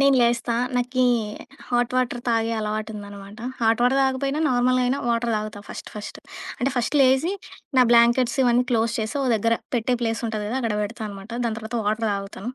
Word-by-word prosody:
నేను 275 Hz, -1 st, +5 dB
లేస్తా. 235 Hz, 0 st, +2 dB, 0.2 s
నాకి 250 Hz, +1 st, +1 dB, 0.6 s
హాట్ 245 Hz, 0 st, +1 dB
వాటర్ 250 Hz, -1 st, 0 dB
తాగే 225 Hz, -1 st, +1 dB
అలవాటుందనమాట. 210 Hz, -1 st, -5 dB, 0.2 s
హాట్ 225 Hz, 0 st, +2 dB
వాటర్ 250 Hz, +2 st, +3 dB
తాగకపోయినా 275 Hz, +2 st, 0 dB
నార్మల్‌గా 255 Hz, 0 st, +2 dB
అయినా 260 Hz, +3 st, +1 dB
వాటర్ 235 Hz, 0 st, +1 dB
తాగుతా 210 Hz, -1 st, -5 dB
ఫస్ట్ -, -, -8 dB
ఫస్ట్. 210 Hz, 0 st, -7 dB, 0.4 s
అంటే 270 Hz, -, 0 dB
ఫస్ట్ 245 Hz, +4 st, 0 dB
లేసి, 265 Hz, +7 st, +4 dB, 0.4 s
నా 255 Hz, -, +8 dB
బ్లాంకెట్స్ 235 Hz, +1 st, +4 dB
ఇవన్నీ 245 Hz, 0 st, +3 dB
క్లోజ్ 230 Hz, -1 st, +2 dB
చేసి 220 Hz, 0 st, -2 dB
ఒక 265 Hz, -, 0 dB
దగ్గర 230 Hz, +2 st, +2 dB, 0.2 s
పెట్టే 245 Hz, +2 st, +1 dB
ప్లేస్ 225 Hz, -1 st, -1 dB
ఉంటది 215 Hz, -2 st, -3 dB
గదా! 245 Hz, -, -2 dB
అక్కడ 230 Hz, -4 st, -1 dB
పెడతా 220 Hz, +2 st, -5 dB
అనమాట. 200 Hz, +2 st, -10 dB
దాని 225 Hz, -2 st, -1 dB
తర్వాత 220 Hz, +2 st, -5 dB
వాటర్ 220 Hz, +2 st, 0 dB
తాగుతా. 195 Hz, -1 st, -5 dB
235 Hz, 175 wpm, -23 LUFS, 220-250 Hz, 0.6 s, నా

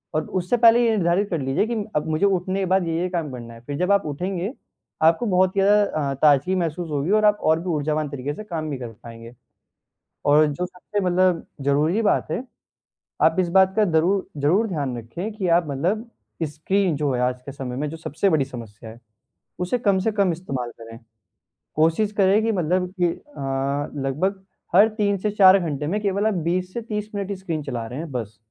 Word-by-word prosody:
और 155 Hz, 0 st, 0 dB
उससे 180 Hz, +7 st, 0 dB
पहले 235 Hz, +1 st, +6 dB
ये -, -, +3 dB
निर्धारित 180 Hz, +3 st, +1 dB
कर 170 Hz, -, -1 dB
लीजिए 135 Hz, +8 st, +1 dB
कि 235 Hz, -, -2 dB, 0.2 s
अब 150 Hz, -, 0 dB
मुझे 155 Hz, +5 st, +1 dB
उठने 190 Hz, 0 st, 0 dB
के 190 Hz, -, 0 dB
बाद 185 Hz, -1 st, +1 dB
ये-ये 165 Hz, +2 st, -1 dB
काम 165 Hz, -6 st, -3 dB
करना 120 Hz, -2 st, -8 dB
है, 115 Hz, -, -12 dB
फिर 140 Hz, +3 st, -6 dB
जब 180 Hz, +4 st, +1 dB
आप 200 Hz, -2 st, +3 dB
उठेंगे 180 Hz, -, -3 dB, 0.5 s
आपको 165 Hz, +8 st, +4 dB
बहुत 185 Hz, -2 st, +2 dB
ज़्यादा 205 Hz, +1 st, +4 dB, 0.3 s
अ, -, -, -1 dB
ताजगी 150 Hz, +5 st, +4 dB
महसूस 170 Hz, -1 st, -2 dB
होगी 150 Hz, +5 st, -1 dB
और 215 Hz, 0 st, +4 dB
आप 210 Hz, 0 st, +4 dB
और 160 Hz, +1 st, +3 dB
भी 180 Hz, +1 st, -5 dB
ऊर्जावान 150 Hz, -1 st, -1 dB
तरीके 140 Hz, +1 st, -4 dB
से 215 Hz, -, -8 dB
काम 160 Hz, -6 st, -4 dB
भी 140 Hz, -, -3 dB
कर 125 Hz, -2 st, -6 dB, 0.2 s
पाएँगे। 115 Hz, 0 st, -11 dB, 0.9 s
और 150 Hz, +1 st, +5 dB
जो 150 Hz, +5 st, -2 dB
सबसे 180 Hz, +3 st, -5 dB
मतलब 180 Hz, -2 st, +2 dB
ज़रूरी 150 Hz, +9 st, +1 dB
बात 205 Hz, -6 st, +1 dB
है 220 Hz, +11 st, -2 dB, 0.8 s
आप 160 Hz, +2 st, +4 dB
इस 180 Hz, -, 0 dB
बात 190 Hz, +1 st, +4 dB
का 215 Hz, -, +4 dB
ज़रू 180 Hz, +5 st, +2 dB
ज़रूर 170 Hz, +11 st, +2 dB
ध्यान 140 Hz, -8 st, -3 dB
रखें 170 Hz, -, -6 dB
कि 195 Hz, -4 st, -3 dB
आप 170 Hz, 0 st, +3 dB
मतलब 185 Hz, -, -2 dB, 0.3 s
स्क्रीन 160 Hz, +3 st, 0 dB
जो 145 Hz, -2 st, 0 dB
है 125 Hz, -, -1 dB
आज 125 Hz, 0 st, 0 dB
के 140 Hz, -, -8 dB
समय 130 Hz, -2 st, -6 dB
में 150 Hz, +3 st, -2 dB
जो 165 Hz, -, -7 dB
सबसे 160 Hz, +4 st, -1 dB
बड़ी 150 Hz, -4 st, +2 dB
समस्या 115 Hz, -4 st, -10 dB
है 115 Hz, -, -13 dB, 0.6 s
उसे 180 Hz, +8 st, 0 dB
कम 200 Hz, -5 st, +2 dB
से 215 Hz, +3 st, 0 dB
कम 200 Hz, -4 st, +2 dB
इस्तेमाल 135 Hz, -8 st, -4 dB
करें। 115 Hz, 0 st, -10 dB, 0.8 s
कोशिश 165 Hz, +7 st, +2 dB
करें 195 Hz, +2 st, +4 dB
कि 225 Hz, -, +1 dB
मतलब 180 Hz, -1 st, 0 dB
कि 175 Hz, -, +5 dB
अ, 140 Hz, -, -3 dB, 0.2 s
लगभग 190 Hz, +8 st, -1 dB, 0.3 s
हर 205 Hz, +4 st, +8 dB
3 200 Hz, -1 st, +1 dB
से 210 Hz, +2 st, -2 dB
4 195 Hz, -1 st, +7 dB
घंटे 150 Hz, -4 st, -3 dB
में 205 Hz, +5 st, 0 dB
केवल 200 Hz, 0 st, 0 dB
आप 220 Hz, -, +1 dB, 0.2 s
20 185 Hz, +1 st, -1 dB
से 235 Hz, -, -3 dB
30 210 Hz, -1 st, -4 dB
मिनट 200 Hz, -1 st, -3 dB
ही 200 Hz, -, -2 dB
स्क्रीन 170 Hz, -5 st, -4 dB
चला 120 Hz, -5 st, -4 dB
रहे 125 Hz, +5 st, -6 dB
हैं 160 Hz, -3 st, -6 dB
बस। 110 Hz, -4 st, -5 dB
170 Hz, 210 wpm, -23 LUFS, 145-195 Hz, 0.9 s, हर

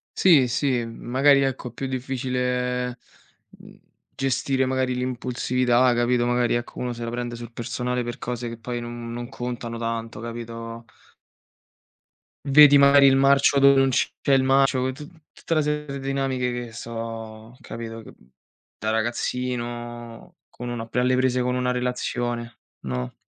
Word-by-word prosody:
Sì, 155 Hz, -9 st, +5 dB
sì, 125 Hz, -1 st, 0 dB
mhmm, 115 Hz, -, -10 dB
magari, 140 Hz, +2 st, +5 dB
ecco, 130 Hz, -2 st, -2 dB
è 120 Hz, -, -18 dB
più 135 Hz, +2 st, -4 dB
difficile, 125 Hz, -1 st, -2 dB, 0.6 s
uhm, -, -, -16 dB, 0.3 s
gestire, 130 Hz, 0 st, 0 dB
magari, 130 Hz, -1 st, 0 dB
l'impulsività, 125 Hz, 0 st, +1 dB
capito, 120 Hz, 0 st, +2 dB
magari, 120 Hz, -1 st, +1 dB
ecco, 120 Hz, 0 st, -3 dB
uno 125 Hz, -1 st, -2 dB
se 120 Hz, 0 st, -7 dB
la 115 Hz, -, -3 dB
prende 120 Hz, 0 st, -4 dB
sul 120 Hz, 0 st, -9 dB
personale 125 Hz, +1 st, -3 dB
per 120 Hz, 0 st, -6 dB
cose 120 Hz, 0 st, -4 dB
che 115 Hz, -1 st, -7 dB
poi 120 Hz, +1 st, -4 dB
non 120 Hz, 0 st, -7 dB
non 120 Hz, 0 st, -5 dB
contano 120 Hz, -2 st, -5 dB
tanto, 115 Hz, -1 st, -4 dB
capito? 115 Hz, 0 st, -7 dB, 1.6 s
Vedi 145 Hz, 0 st, +8 dB
magari 140 Hz, 0 st, +7 dB
il 135 Hz, -, +5 dB
marcio 140 Hz, +1 st, +4 dB
dove 140 Hz, 0 st, +6 dB
non 135 Hz, -, +4 dB
c'è 130 Hz, -, +1 dB, 0.2 s
il 135 Hz, -1 st, +4 dB
marcio, 135 Hz, -1 st, +3 dB
t 145 Hz, +3 st, -10 dB, 0.2 s
tutta -, -, -4 dB
una 155 Hz, -, +3 dB
serie 150 Hz, 0 st, -1 dB
de 140 Hz, -1 st, -6 dB
dinamiche 135 Hz, -2 st, -1 dB
che 120 Hz, -1 st, -5 dB
so 115 Hz, 0 st, -7 dB
capito, 115 Hz, -1 st, -7 dB
che -, -, -13 dB, 0.6 s
da 110 Hz, -, -3 dB
ragazzino 120 Hz, 0 st, -3 dB
con 120 Hz, -, -8 dB
uno 120 Hz, -1 st, -4 dB
ap 115 Hz, -, -14 dB
alle 125 Hz, +1 st, +3 dB
prese 130 Hz, -1 st, +1 dB
con 125 Hz, 0 st, 0 dB
una 125 Hz, 0 st, 0 dB
relazione, 120 Hz, -1 st, -3 dB, 0.2 s
no? 65 Hz, -1 st, -4 dB
125 Hz, 155 wpm, -24 LUFS, 120-130 Hz, 1.6 s, Vedi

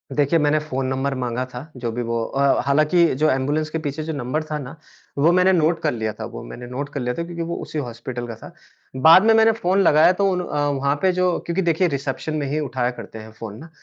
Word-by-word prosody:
देखिए, 150 Hz, +3 st, +2 dB
मैंने 150 Hz, +1 st, +2 dB
phone 135 Hz, -3 st, -3 dB
number 135 Hz, +1 st, -1 dB
माँगा 125 Hz, 0 st, -2 dB
था 140 Hz, +6 st, -8 dB
जो 120 Hz, -2 st, -3 dB
भी 120 Hz, +2 st, -3 dB
वो 115 Hz, 0 st, -2 dB
अ, 140 Hz, +2 st, +1 dB
हालाँकि 155 Hz, +5 st, +3 dB
जो 155 Hz, +3 st, +2 dB
एंबुलेंस 145 Hz, +4 st, 0 dB
के 160 Hz, -, -3 dB
पीछे 150 Hz, 0 st, -4 dB
जो 160 Hz, 0 st, -4 dB
नंबर 140 Hz, +3 st, -2 dB
था 155 Hz, -1 st, -4 dB
ना, 140 Hz, +3 st, -8 dB, 0.4 s
वो 160 Hz, +5 st, +4 dB
मैंने 185 Hz, +1 st, +4 dB
नोट 165 Hz, 0 st, +2 dB
कर 155 Hz, -, +1 dB
लिया 110 Hz, -2 st, -3 dB
था -, -, -7 dB
वो -, -, -7 dB
मैंने 120 Hz, -, -9 dB
नोट 140 Hz, +3 st, -5 dB
कर 140 Hz, -, -3 dB
लिया 125 Hz, 0 st, -2 dB
था 170 Hz, -, -1 dB
क्योंकि 170 Hz, -1 st, -6 dB
वो 170 Hz, +1 st, -3 dB
उसी 155 Hz, -, -6 dB
हॉस्पिटल 120 Hz, -1 st, -6 dB
का 115 Hz, -, -6 dB
था। -, -, -13 dB, 0.5 s
बाद 165 Hz, +6 st, +8 dB
में 225 Hz, -, +6 dB
मैंने 225 Hz, 0 st, +5 dB
फ़ोन 195 Hz, -3 st, +1 dB
लगाया 155 Hz, +2 st, +6 dB
तो 195 Hz, +1 st, +1 dB
उन 180 Hz, 0 st, -1 dB
अ, 145 Hz, -4 st, -1 dB
वहाँ 140 Hz, +1 st, 0 dB
पे 190 Hz, -1 st, +3 dB
जो 180 Hz, -1 st, +1 dB
क्योंकि 170 Hz, +3 st, -1 dB
देखिए 175 Hz, +1 st, +2 dB
रिसेप्शन 140 Hz, +1 st, -3 dB
में 145 Hz, -2 st, -2 dB
ही 150 Hz, +3 st, -1 dB
उठाया 125 Hz, -3 st, -1 dB
करते 110 Hz, -, -9 dB
हैं 110 Hz, 0 st, -11 dB
फ़ोन 110 Hz, -2 st, -7 dB
ना, 160 Hz, -, -11 dB
145 Hz, 250 wpm, -22 LUFS, 130-165 Hz, 0.5 s, बाद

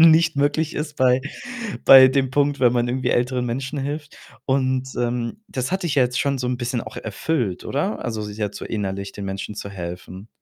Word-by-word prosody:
nicht 165 Hz, -1 st, +6 dB
möglich 145 Hz, +3 st, +1 dB
ist 150 Hz, 0 st, -4 dB
bei 130 Hz, 0 st, +4 dB, 0.6 s
bei 130 Hz, -1 st, +10 dB
dem 130 Hz, -1 st, +1 dB
Punkt, 145 Hz, 0 st, +1 dB
wenn 120 Hz, -2 st, +5 dB
man 120 Hz, -1 st, +1 dB
irgendwie 130 Hz, +1 st, 0 dB
älteren 125 Hz, 0 st, +1 dB
Menschen 135 Hz, +4 st, -3 dB
hilft. 145 Hz, +2 st, -4 dB, 0.3 s
Und, 130 Hz, -1 st, +1 dB
ähm, 120 Hz, -, -2 dB
das 130 Hz, +2 st, -3 dB
hat 190 Hz, +1 st, -1 dB
dich 170 Hz, -5 st, -1 dB
ja 135 Hz, -, +6 dB
jetzt 125 Hz, 0 st, 0 dB
schon 140 Hz, -1 st, 0 dB
so 125 Hz, -, -2 dB
'n 125 Hz, 0 st, 0 dB
bisschen 120 Hz, 0 st, -2 dB
auch -, -, -9 dB
erfüllt, 110 Hz, -, -2 dB
oder? 170 Hz, +10 st, -2 dB
Also, 110 Hz, -3 st, -3 dB
sich 105 Hz, 0 st, -7 dB
jetzt 105 Hz, -2 st, -2 dB
so -, -, -6 dB
innerlich 100 Hz, -2 st, -3 dB
den 100 Hz, -2 st, -6 dB
Menschen 95 Hz, +2 st, -5 dB
zu 100 Hz, -, -6 dB
helfen. 90 Hz, +1 st, -7 dB
125 Hz, 205 wpm, -22 LUFS, 115-140 Hz, 0.6 s, bei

